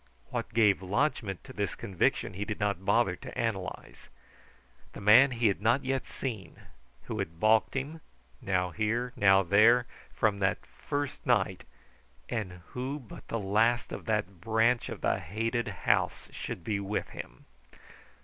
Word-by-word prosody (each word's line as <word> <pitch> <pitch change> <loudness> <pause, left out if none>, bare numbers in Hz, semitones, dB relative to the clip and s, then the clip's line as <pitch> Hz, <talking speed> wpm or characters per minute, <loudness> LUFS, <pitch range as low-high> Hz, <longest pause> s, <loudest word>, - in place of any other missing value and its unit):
What - - -3
gave 105 -4 +4
lodgment 100 - -1
to 130 - -11
this 100 -6 -2
conviction 95 -3 0
he 100 +3 -3
did 105 0 -4
not 100 -2 -1
bother - - +2
to - - -9
analyze. - - -4 0.8
The - - -8
man 110 +7 +7
he 120 -2 -2
had 100 -1 0
not 120 +5 +2
yet 135 0 -1
seen, 110 -10 -6 0.4
who - - -5
had 80 +1 -4
balked 110 +4 +3
him, 145 +5 -4 0.4
now 90 -2 0
here, 115 +6 -1
now 95 -1 +5
there, 110 +7 +5 0.3
from 105 -3 +1
that 95 -1 0
first 145 -1 -4
night; - - +1 0.6
and 90 -6 -4
who 130 +3 -4
but 125 -7 -12
the 115 - -2
last 110 +4 +1
of - - -6
that 105 -5 -2
branch 115 +3 +2
of - - -7
the - - +1
hated 115 +7 -2
house 100 -5 0
should 85 - -6
be 105 +1 -1
with 100 +1 -3
him? - - -10
110 Hz, 155 wpm, -30 LUFS, 95-120 Hz, 0.8 s, man